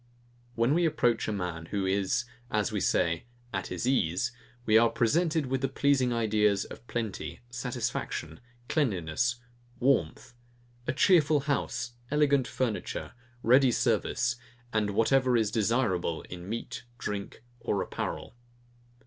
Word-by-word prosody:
When 115 +4 +3
we 170 +1 +3
approach 120 -7 +1
a - - 0
man 90 -5 -4
who 100 +1 -1
is, 95 +3 +1 0.2
as 105 -2 0
we - - -1
say, 85 +1 +1 0.3
at 95 -1 -2
his 90 +5 -3
ease, 110 -3 +1 0.3
we 110 - +3
are 115 +1 +7
presented 155 +7 +1
with 130 0 -1
the 135 - +2
pleasing 135 -1 +2
ideas 105 -3 +2
of 120 - -12
plenty, 115 -4 -4
satisfaction, 120 - -3 0.3
cleanliness, 110 - 0 0.4
warmth; 120 - +1 0.5
a - - +2
cheerful 150 -1 +4
house, 140 -4 -1 0.2
elegant 145 -3 +3
furniture, 120 -5 -3 0.3
ready 130 +2 +6
service, 120 +1 +1 0.4
and 105 -1 +1
whatever 125 +4 +3
is 110 -3 +1
desirable 110 -7 0
in 90 +1 -9
meat, 115 +1 -4 0.2
drink, 105 0 -5 0.2
or 105 -3 -1
apparel. - - -5
115 Hz, 130 wpm, -29 LUFS, 100-130 Hz, 0.5 s, are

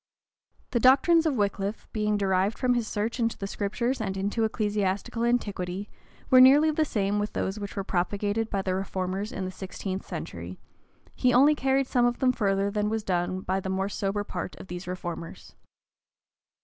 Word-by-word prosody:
The 240 - +1
doctrines 300 +7 +5
of 295 - +1
Wickliffe 205 -1 -2
being 210 -1 +1
derived 195 +1 +1
from 250 -1 +2
his 240 -2 -1
search 215 +5 -2
into 230 -1 0
the 195 - -4
Scriptures 230 +6 -2
and 195 -3 -3
into 205 +4 -1
ecclesiastical 210 0 -1
antiquity, 205 -5 -1 0.4
were 255 0 +9
nearly 290 +4 +7
the 310 +1 +1
same 205 -5 0
with 205 +1 -2
those 195 +3 -2
which 200 -1 -6
were 195 - -2
propagated 205 +4 -1
by 195 -2 -1
the 185 - -1
reformers 190 +2 -3
in 190 - -4
the 185 - -4
sixteenth 190 0 -5
century: 90 - -7 0.5
he 250 -1 +2
only 280 +4 +6
carried 270 -1 +1
some 245 -1 +2
of 240 - -1
them 255 -1 +3
farther 200 -4 0
than 210 0 0
was 220 0 -2
done 185 -1 -1
by 190 +1 -1
the 190 - -5
more 190 +1 -1
sober 205 0 -2
part 180 -2 -5
of - - -12
these 180 +1 -6
reformers. 175 -2 -6
205 Hz, 180 wpm, -27 LUFS, 190-235 Hz, 0.5 s, were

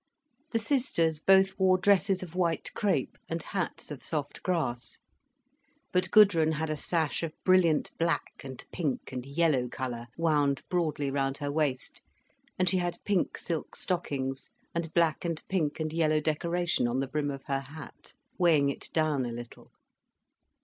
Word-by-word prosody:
The 230 - +2
sisters 225 - +1
both 190 +3 +4
wore 185 -1 +5
dresses 195 0 +3
of 170 -3 -9
white 170 -3 0
crêpe, 205 -2 0
and 165 -1 -3
hats 190 -4 -4
of 145 - -7
soft 150 -3 -3
grass. 155 -10 -2 0.9
But 185 0 +1
Gudrun 170 -7 +6
had 155 0 -2
a - - 0
sash 160 0 0
of 165 -2 -3
brilliant 180 -5 +4
black 165 -2 -1
and 130 -2 -8
pink 150 -8 -2
and 125 -1 -4
yellow 140 -4 +2
colour 120 -2 -5
wound 145 -4 +2
broadly 155 -5 0
round 135 0 0
her 145 0 -3
waist, 145 -4 -1 0.6
and 185 - +1
she 185 - +3
had 175 -1 -1
pink 200 -4 +1
silk 165 -3 -4
stockings, 135 -7 -2 0.2
and 170 -1 -2
black 165 -3 +2
and 165 -2 -2
pink 165 -6 -1
and 155 0 -2
yellow 155 -2 +2
decoration 165 -1 0
on 120 +2 0
the 135 - -1
brim 145 +1 -1
of 140 -1 -5
her 135 -1 -1
hat, 145 +2 -11 0.2
weighing 155 -6 +4
it - - -8
down 155 -4 +1
a 120 - -3
little. 120 0 -9
160 Hz, 160 wpm, -29 LUFS, 140-180 Hz, 0.9 s, Gudrun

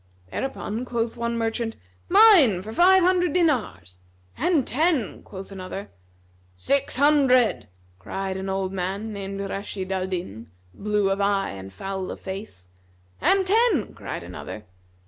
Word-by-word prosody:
Thereupon 245 - -3
quoth 235 -2 -2
one 235 0 -2
merchant, 225 0 -2 0.3
"Mine 350 - +7
for 220 +2 -7
five 370 +5 +6
hundred 355 -3 +2
dinars;" 210 - 0 0.4
"And 315 -3 +1
ten," 295 - 0
quoth 195 0 -10
another. 190 +1 -7 0.6
"Six 275 - 0
hundred," 270 -4 +4 0.3
cried 190 - -4
an 190 0 -4
old 190 0 -2
man 195 +4 -3
named 195 -1 -5
Rashнd 195 -1 -5
al 190 -1 -1
Din, 120 - -5 0.2
blue 210 -1 0
of 195 - -1
eye[FN#264] 200 - 0
and 95 0 -9
foul 190 - -5
of - - -6
face. 190 - -8 0.5
"And 390 -1 +3
ten," 455 +5 +2
cried - - -6
another. 105 - -8
210 Hz, 135 wpm, -24 LUFS, 190-275 Hz, 0.6 s, Mine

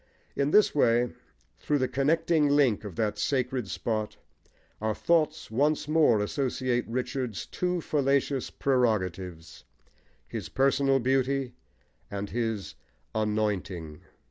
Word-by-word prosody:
In 140 +1 +1
this 210 +6 +5
way, 120 -3 +3 0.5
through 150 - 0
the 130 -2 +1
connecting 150 +3 +2
link 140 -8 +3
of 100 -5 -7
that 105 0 -1
sacred 125 -1 0
spot, 110 -1 -3 0.6
our 110 -1 0
thoughts 155 -6 +1
once 145 +6 +1
more 155 -8 +4
associate 125 +1 -1
Richard's 125 -2 -3
two 180 -1 -2
fallacious 140 -2 0
prerogatives, 95 - -1 0.6
his - - -6
personal 135 0 +3
beauty 135 +1 0 0.6
and 100 0 -5
his 115 -4 -2 0.4
"anointing." 100 -7 -2
125 Hz, 110 wpm, -28 LUFS, 110-140 Hz, 0.6 s, this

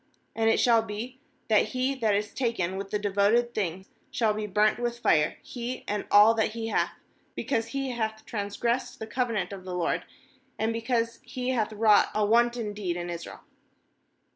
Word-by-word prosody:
15And 225 0 +1
it - - +3
shall 230 -2 +5
be 225 +4 -6 0.3
that 215 -2 +5
he 255 +4 0
that 225 -6 +1
is 205 +1 -2
taken 230 -8 -1
with 195 0 -5
the 210 - 0
devoted 205 +4 +2
thing 190 -3 -2 0.2
shall 220 -3 +1
be 210 0 -3
burnt 210 +3 +2
with 240 0 -2
fire, 155 -10 +2
he 245 +1 -5
and 210 0 -2
all 210 +2 +7
that 220 -1 0
he 225 -1 -4
hath; - - 0 0.4
because 230 -5 -1
he 270 0 -3
hath 220 -2 -3
transgressed 230 +4 -2
the 220 - -6
covenant 220 -6 -2
of 190 -2 -8
the 185 -1 -5
LORD, 175 -1 0 0.5
and 225 +1 0
because 230 0 -1
he 255 0 -4
hath 225 -4 0
wrought 215 -1 +4
a 210 0 +2
wan 235 +3 +4
ton 230 -3 -5
deed 185 -4 -3
in 175 0 -4
Israel.' 170 0 -7
220 Hz, 185 wpm, -27 LUFS, 205-235 Hz, 0.5 s, all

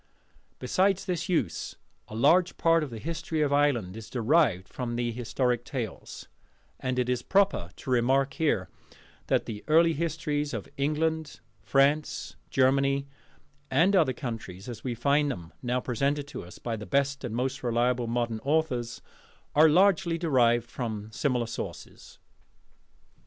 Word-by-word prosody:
Besides 190 +9 +1
this 180 -1 -2
use 125 - -1 0.3
a 110 - -9
large 170 +10 +3
part 165 -1 +3
of 150 - -4
the 115 - -7
History 160 +3 -2
of 145 -1 +1
Ireland 130 -10 +2
is 110 -1 -9
derived 120 - +2
from 120 -2 -4
the 120 0 -1
historic 120 +1 -1
tales; 120 -6 -6 0.5
and 130 -1 -2
it 125 -1 +1
is 125 -1 0
proper 195 - +2
to - - -9
remark 135 +3 +2
here 145 - 0 0.6
that - - +1
the 105 -2 -6
early 165 +2 +5
histories 150 -3 -2
of 105 - -5
England, 155 +2 -1 0.2
France, 145 +3 +1
Germany, 135 +1 +2 0.6
and 170 +9 +3
other 160 -8 +4
countries, 115 -7 -6
as 115 -3 -7
we 125 -2 -2
find 140 +4 +2
them 85 -10 -6
now 125 0 0
presented 140 +4 -1
to - - -7
us 90 - -12
by 115 -2 -3
the 105 -2 -8
best 140 +5 0
and 120 -3 -4
most 130 +3 -2
reliable 120 0 +1
modern 115 -1 -1
authors, 135 -4 -1 0.5
are 155 +2 +6
largely 175 0 +3
derived 120 -8 +2
from 110 -3 -5
similar 125 0 0
sources. 115 - -8
135 Hz, 145 wpm, -28 LUFS, 120-155 Hz, 0.6 s, are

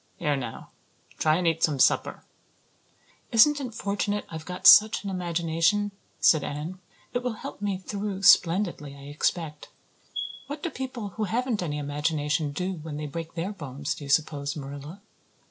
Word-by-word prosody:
Here 145 -1 0
now, 125 -4 -6 0.5
try 155 0 +3
and 180 +1 -1
eat 165 -1 +1
some 150 -3 +2
supper." 130 - +2 1.1
"Isn't 290 +6 +6
it 245 -4 -6
fortunate 205 0 -1
I've 160 -1 -7
got 180 0 -6
such 215 0 +8
an 200 - -3
imagination?" 175 +3 +1 0.3
said 155 -3 +5
Anne. 155 +6 -5 0.3
"It 245 - 0
will 250 -1 -2
help 215 - -8
me 200 -2 -1
through 195 0 -4
splendidly, 170 -6 +4
I 140 0 -11
expect. 155 0 -2 0.8
What 290 +1 -6
do 340 - -2
people 250 -5 -5
who 215 +3 -3
haven't 235 +1 -1
any 150 -4 -2
imagination 150 +1 -1
do 180 +6 -2
when 155 -1 -6
they 150 - -4
break 165 +2 -6
their 175 +4 -2
bones, 145 -6 -4
do - - -10
you - - -9
suppose, 145 -1 +1
Marilla?" 145 +5 -8
165 Hz, 160 wpm, -27 LUFS, 150-205 Hz, 1.1 s, such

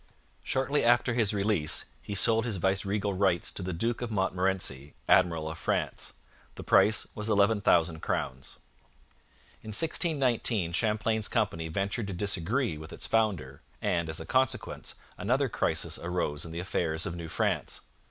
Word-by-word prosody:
Shortly 135 +2 0
after 120 +1 +3
his 115 -4 +2
release 100 -7 0 0.2
he 100 - -6
sold 115 +3 +5
his 115 -5 -3
viceregal 100 +2 0
rights 95 -3 +1
to - - -5
the 95 0 -3
Duke 115 +9 -1
of 120 - -3
Montmorency, 95 -8 -1
Admiral 85 -4 +3
of 80 0 -6
France. - - -2 0.4
The - - -8
price 105 -1 +5
was 105 +1 0
11,000 100 -6 +3
crowns. 65 -3 -4 1.0
In - - -14
1619 125 - +2
Champlain's 110 +3 0
company 80 0 -1
ventured 100 +6 -2
to 100 - -4
disagree 100 - -1
with 80 +1 -10
its - - -4
founder, 95 -12 0 0.2
and, 85 -2 -1
as 80 - -3
a 80 - -7
consequence, 130 +4 -1 0.2
another 130 +8 +1
crisis - - -1
arose 85 -4 -2
in 85 - -8
the 85 - -6
affairs 85 -3 -2
of 85 - -4
New 85 -1 -6
France. - - -1
100 Hz, 150 wpm, -29 LUFS, 85-115 Hz, 1.0 s, sold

